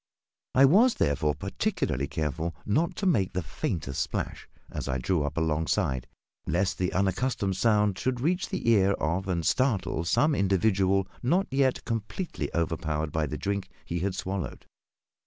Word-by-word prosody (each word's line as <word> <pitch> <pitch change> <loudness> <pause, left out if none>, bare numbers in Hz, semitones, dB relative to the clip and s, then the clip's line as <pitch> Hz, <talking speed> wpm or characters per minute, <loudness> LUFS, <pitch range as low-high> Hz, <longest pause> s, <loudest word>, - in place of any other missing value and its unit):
I 135 +1 +8
was 220 - +5
therefore 75 +1 +1
particularly 65 +2 -1
careful 80 +2 -2
not 155 +11 +1
to 200 - -3
make 110 - +2
the 90 -1 -1
faintest 75 -2 -3
splash, - - -4 0.2
as - - -4
I 65 -1 0
drew 80 +6 0
up 75 +2 -4
alongside, 80 -5 0 0.4
lest 95 -2 0
the 90 -1 0
unaccustomed 100 +1 0
sound 105 -1 +2
should 130 -1 -1
reach 175 +8 0
the - - -3
ear 100 -3 +4
of 90 +3 -1
and 85 -3 -1
startle 110 - +1
some 150 - +3
individual 95 -2 +2
not 175 +10 +2
yet 135 -1 +1
completely 115 - -3
overpowered 80 -2 -1
by 80 0 0
the - - -4
drink 100 -1 -2 0.2
he 85 - -2
had 95 +2 -1
swallowed. 95 -1 -4
95 Hz, 155 wpm, -28 LUFS, 80-115 Hz, 0.4 s, I